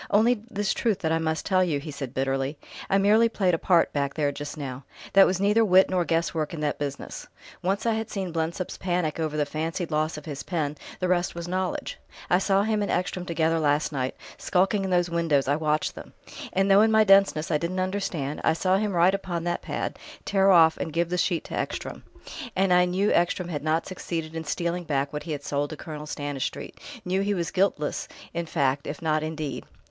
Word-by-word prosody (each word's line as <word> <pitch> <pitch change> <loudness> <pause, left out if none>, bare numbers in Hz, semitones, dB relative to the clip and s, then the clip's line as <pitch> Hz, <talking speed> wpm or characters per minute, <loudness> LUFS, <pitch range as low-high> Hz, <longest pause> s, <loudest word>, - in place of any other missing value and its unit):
"Only 225 +2 +3
this 205 -3 -1
truth 220 -5 0
that 160 - 0
I 165 - +2
must 160 0 -1
tell 185 -1 +3
you," 155 -6 0
he 155 +2 -7
said 135 -3 -6
bitterly: 135 +2 -1 0.3
"I 195 - +4
merely 215 +4 +4
played 190 -5 +1
a 165 - +1
part 175 -3 +3
back 140 -1 -1
there, 145 -2 +1
just 145 +2 -7
now. 135 -2 -6 0.3
There 195 0 +8
was 185 0 0
neither 210 +3 +4
wit 190 -2 +5
nor 180 -2 +1
guess 165 +1 0
work 160 0 -2
in - - -6
that 150 -1 -1
business; 140 -1 -5 0.3
once 195 +4 -1
I 230 - +3
had 220 0 -3
seen 190 -4 -3
Blensop's 165 +2 -3
panic 175 -4 -1
over 155 -2 -1
the 150 - +2
fancied 160 +3 -3
loss 155 +1 0
of 150 - -9
his 145 -3 -5
pen, 155 -5 -2 0.2
the 185 - 0
rest 175 -1 +1
was 170 0 -5
knowledge. 185 +1 -3 0.3
I 180 - +5
saw 195 0 +2
him 215 0 0
and 205 - -1
Ekstrom 180 0 -1
together 165 -1 +1
last 150 0 +1
night 130 -3 -2 0.2
skulking 195 +2 +1
in 190 - -2
those 175 -1 +2
windows, 165 -5 +1
I 140 - +3
watched 155 0 0
them; - - -11 0.4
and 195 +1 +2
though 195 +1 +7
in 220 - +5
my 220 0 +6
denseness 195 -6 +4
I 150 - +2
didn't 175 +3 -2
understand, 185 -7 -2
I 160 - +4
saw 185 +3 +2
him 210 0 -1
write 175 +2 +4
upon 180 -4 -3
that 175 0 -1
pad, - - -4 0.3
tear 195 -1 +3
off 165 -3 +6
and 160 - -4
give 170 +2 0
the 180 - -1
sheet 175 -3 +1
to - - -10
Ekstrom. - - -4 0.5
And 190 -1 +3
I 180 0 +5
knew 190 +3 +1
Ekstrom 175 +1 +1
had 145 -4 -4
not 160 +1 +1
succeeded 165 -3 -5
in 160 0 -4
stealing 170 +3 -2
back 140 -2 -1
what 150 - -3
he - - 0
had 145 - -5
sold 145 0 -1
to 155 - -7
Colonel 150 -1 -7
Stanistreet, 145 -2 -4 0.3
knew 185 +2 +1
he 205 +1 0
was 170 -2 -2
guiltless 185 -6 0 0.3
in 170 0 -3
fact 140 -3 0
if 145 - -5
not 155 -1 +1
in 155 +1 -4
deed." 150 -3 -4
170 Hz, 225 wpm, -26 LUFS, 150-190 Hz, 0.5 s, There